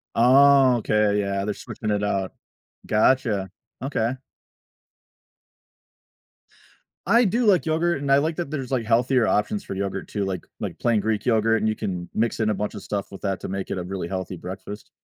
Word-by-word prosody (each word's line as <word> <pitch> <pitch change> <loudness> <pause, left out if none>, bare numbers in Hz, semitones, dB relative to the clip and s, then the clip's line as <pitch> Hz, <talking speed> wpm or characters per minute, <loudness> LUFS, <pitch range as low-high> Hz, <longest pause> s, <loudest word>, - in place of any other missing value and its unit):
Okay, 125 -5 +5
yeah, 100 -1 -1
they're 105 0 -2
switching 110 - -6
it 105 0 0
out. 95 -2 -1 0.5
Gotcha, 105 -4 +2 0.3
okay. 130 -2 -1 2.9
I 235 +5 +5
do 230 +4 +1
like 190 -4 +4
yogurt, 165 0 +1
and 140 -1 0
I 140 - +6
like 155 +3 0
that 175 -4 -3
there's, 135 -4 -4
like, 125 -4 0
healthier 120 +1 +2
options 205 - 0
for - - -6
yogurt 100 0 -3
too, 100 - -2
like 95 -3 -4
like - - -5
plain 115 -3 +2
Greek 110 +1 -2
yogurt, 115 -1 +3
and 110 - +1
you 110 - +1
can 90 -4 -4
mix 115 +1 0
in 110 -1 +1
a - - +1
bunch 105 +2 -3
of 105 - -7
stuff 100 -2 -4
with 95 - -10
that 95 -2 -2
to - - -6
make 95 0 -4
it - - -2
a - - -3
really 90 -1 -4
healthy 95 0 -4
breakfast. 95 +4 -8
110 Hz, 185 wpm, -24 LUFS, 100-135 Hz, 2.9 s, I